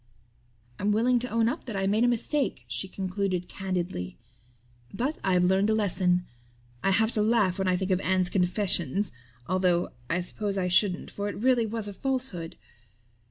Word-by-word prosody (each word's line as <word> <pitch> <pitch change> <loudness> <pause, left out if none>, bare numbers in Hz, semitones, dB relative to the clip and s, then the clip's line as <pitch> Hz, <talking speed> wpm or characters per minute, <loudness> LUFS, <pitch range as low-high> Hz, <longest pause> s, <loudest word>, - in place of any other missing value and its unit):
"I'm 205 +1 +1
willing 240 +4 +3
to 250 +2 -1
own 230 0 +2
up 280 +8 -2
that 230 -5 -5
I 195 0 0
made 210 +4 +2
a - - +5
mistake," 245 - 0
she 120 +9 -3
concluded 185 -1 -2
candidly, 180 - -4 0.7
"but 260 +9 -2
I've 180 -2 +3
learned 190 +3 +3
a 220 - +3
lesson. 180 -4 +1 0.6
I - - +3
have 220 +4 +3
to 215 - 0
laugh 210 -4 +2
when 190 - 0
I 180 0 +3
think 190 +1 -2
of 185 - +3
Anne's 185 -1 +1
'confession,' 185 -1 +1 0.4
although 180 0 +1 0.2
I 175 +2 +1
suppose 200 +2 -3
I 180 -1 0
shouldn't 180 0 +2
for 205 0 -3
it - - -5
really 240 0 +2
was 220 -1 -2
a 205 - -5
falsehood. 245 -8 -2
195 Hz, 175 wpm, -27 LUFS, 180-220 Hz, 0.7 s, a